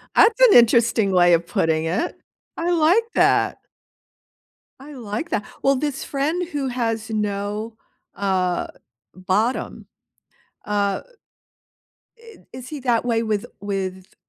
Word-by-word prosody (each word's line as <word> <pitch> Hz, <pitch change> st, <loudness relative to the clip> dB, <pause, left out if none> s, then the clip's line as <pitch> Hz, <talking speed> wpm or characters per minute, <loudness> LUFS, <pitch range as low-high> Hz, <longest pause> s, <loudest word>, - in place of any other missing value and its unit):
That's 465 Hz, +3 st, +5 dB
an -, -, +7 dB
interesting 230 Hz, -3 st, +4 dB
way 175 Hz, -1 st, +5 dB
of 170 Hz, 0 st, +2 dB
putting 160 Hz, -1 st, 0 dB
it. 180 Hz, -, -2 dB, 0.4 s
I 340 Hz, +1 st, -1 dB
like 345 Hz, +6 st, +4 dB
that. -, -, +3 dB, 1.2 s
I 290 Hz, +2 st, -11 dB
like 235 Hz, +4 st, -5 dB
that. 205 Hz, -, -1 dB, 0.2 s
Well, 275 Hz, 0 st, +3 dB
this 285 Hz, 0 st, -3 dB
friend 315 Hz, +6 st, -2 dB
who 285 Hz, -5 st, -3 dB
has 230 Hz, -3 st, -2 dB
no, 210 Hz, +1 st, -3 dB, 0.4 s
uh, 185 Hz, -3 st, -1 dB, 0.5 s
bottom, 190 Hz, +7 st, -2 dB, 0.8 s
uh 205 Hz, -1 st, 0 dB, 1.2 s
i 455 Hz, -2 st, -15 dB, 0.2 s
is 255 Hz, 0 st, -9 dB
he 300 Hz, -1 st, -7 dB
that 240 Hz, -3 st, +1 dB
way 230 Hz, -2 st, 0 dB
with 215 Hz, -3 st, -2 dB
with 190 Hz, -2 st, -5 dB
225 Hz, 120 wpm, -22 LUFS, 200-280 Hz, 1.2 s, an